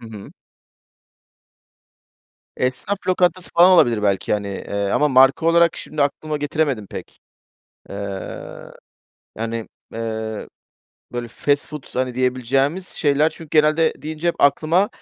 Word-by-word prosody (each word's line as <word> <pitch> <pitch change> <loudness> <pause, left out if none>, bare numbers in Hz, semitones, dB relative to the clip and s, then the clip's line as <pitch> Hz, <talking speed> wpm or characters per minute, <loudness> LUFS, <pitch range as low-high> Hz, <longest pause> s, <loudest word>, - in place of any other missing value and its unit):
Hı 115 - -11
hı. 105 -3 -10 2.2
Esnaf 130 +11 -1
lokantası 180 0 +1
falan 180 +2 +7
olabilir 120 -11 +4
belki, 100 -1 0
hani, 100 -1 -1
eee, 100 +1 -3
ama 150 0 +2
marka 135 +4 +5
olarak 170 0 +4
şimdi 150 -2 -3
aklıma 150 +2 -2
getiremedim 145 -7 -1
pek. - - -9 0.7
Eee, 100 -1 -7 0.7
yani, 115 0 -4 0.3
eee, 110 -1 -4 0.7
böyle, 120 -1 -4
fast 145 +4 0
food, 150 -2 -8
hani, 125 -1 -1
diyebileceğimiz 130 +7 0
şeyler, 150 +1 +2
çünkü 160 -1 -12
genelde 155 +1 +3
deyince 155 +2 -3
hep 170 - +1
aklıma, 165 +7 +3
140 Hz, 120 wpm, -21 LUFS, 115-160 Hz, 2.2 s, falan